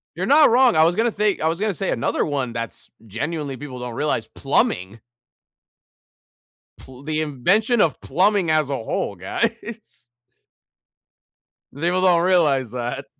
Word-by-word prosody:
You're -, -, -3 dB
not 295 Hz, +1 st, +6 dB
wrong, 245 Hz, 0 st, +4 dB
I 155 Hz, -, +6 dB
was 170 Hz, +2 st, +2 dB
gonna 230 Hz, +4 st, +1 dB
say 210 Hz, -1 st, 0 dB
I 160 Hz, -, +1 dB
was 165 Hz, +1 st, -2 dB
gonna 210 Hz, +1 st, 0 dB
say 190 Hz, +2 st, -3 dB
another -, -, -1 dB
one 135 Hz, -5 st, -3 dB
that's 115 Hz, -4 st, -7 dB, 0.2 s
genuinely 140 Hz, -, -4 dB
people 130 Hz, -1 st, -9 dB
don't 125 Hz, -1 st, -6 dB
realize, 150 Hz, +4 st, -1 dB
plumbing. 95 Hz, +5 st, -1 dB, 1.8 s
Pl 130 Hz, 0 st, -14 dB
the 155 Hz, +1 st, -2 dB
invention 185 Hz, -, +1 dB
of 160 Hz, -, 0 dB
plumbing 195 Hz, -2 st, +1 dB
as 155 Hz, -3 st, +1 dB
a 140 Hz, -, -1 dB
whole, 110 Hz, -2 st, -3 dB
guys. 225 Hz, -, -5 dB, 1.7 s
People 175 Hz, +6 st, -1 dB
don't 175 Hz, -2 st, +4 dB
realize 150 Hz, -, +2 dB
that. 125 Hz, +2 st, -4 dB
155 Hz, 145 wpm, -21 LUFS, 130-195 Hz, 1.8 s, not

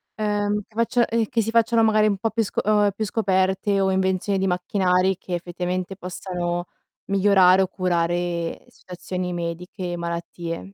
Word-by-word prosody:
Ehm, 210 Hz, -1 st, 0 dB
che 215 Hz, -, -29 dB
faccia 235 Hz, +1 st, +2 dB
ehm, 230 Hz, -1 st, 0 dB
che 225 Hz, +2 st, 0 dB
si 225 Hz, +1 st, -2 dB
facciano 230 Hz, 0 st, +3 dB
magari 215 Hz, -1 st, +4 dB
un 200 Hz, -2 st, +1 dB
po' 225 Hz, +3 st, -1 dB
più 225 Hz, 0 st, +1 dB
sco 205 Hz, -, -2 dB
o 210 Hz, 0 st, +3 dB
ehm, 200 Hz, -, +2 dB
più 215 Hz, -, -2 dB
scoperte 195 Hz, -1 st, +1 dB
o 190 Hz, 0 st, +2 dB
invenzioni 190 Hz, +1 st, 0 dB
di 195 Hz, -, +1 dB
macchinari, 180 Hz, 0 st, +1 dB
che 180 Hz, -, -4 dB
effettivamente 180 Hz, +2 st, -4 dB
possano 175 Hz, -1 st, -4 dB, 0.4 s
migliorare 195 Hz, -1 st, +5 dB
o 190 Hz, -, +2 dB
curare 175 Hz, -2 st, -1 dB
situazioni 180 Hz, 0 st, -6 dB
mediche, 175 Hz, +1 st, -4 dB
malattie. 170 Hz, +2 st, -5 dB
190 Hz, 160 wpm, -23 LUFS, 180-205 Hz, 0.4 s, migliorare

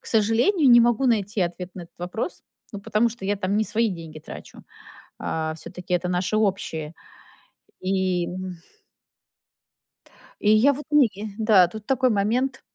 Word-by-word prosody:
к -, -, -18 dB
сожалению, 240 Hz, -, +3 dB
не 240 Hz, 0 st, +8 dB
могу 240 Hz, +2 st, +2 dB
найти 210 Hz, -3 st, +1 dB
ответ 180 Hz, +1 st, -2 dB
на 185 Hz, -, -7 dB
этот 170 Hz, -, -17 dB
вопрос, 180 Hz, -, -4 dB, 0.3 s
ну, 205 Hz, -, -6 dB
потому 215 Hz, +3 st, +1 dB
что 225 Hz, -4 st, -10 dB
я 205 Hz, +1 st, 0 dB
там 195 Hz, +1 st, -1 dB
не 220 Hz, -, +2 dB
свои 225 Hz, +1 st, +1 dB
деньги 165 Hz, -3 st, -8 dB
трачу. -, -, -11 dB, 0.6 s
Э, 160 Hz, 0 st, -2 dB
всё-таки 180 Hz, +2 st, -7 dB
это 180 Hz, 0 st, 0 dB
наше 180 Hz, +4 st, 0 dB
общее. 170 Hz, -6 st, -1 dB, 0.9 s
И 185 Hz, -2 st, 0 dB
м 185 Hz, 0 st, -6 dB, 1.8 s
И 210 Hz, -, +2 dB
я, 275 Hz, +6 st, +5 dB
вот, 290 Hz, +2 st, -7 dB
не 290 Hz, -6 st, +5 dB, 0.3 s
Да, 210 Hz, -5 st, +5 dB
тут 215 Hz, +2 st, -9 dB
такой 260 Hz, -1 st, +2 dB
момент. 230 Hz, +6 st, 0 dB
205 Hz, 155 wpm, -24 LUFS, 180-230 Hz, 1.8 s, не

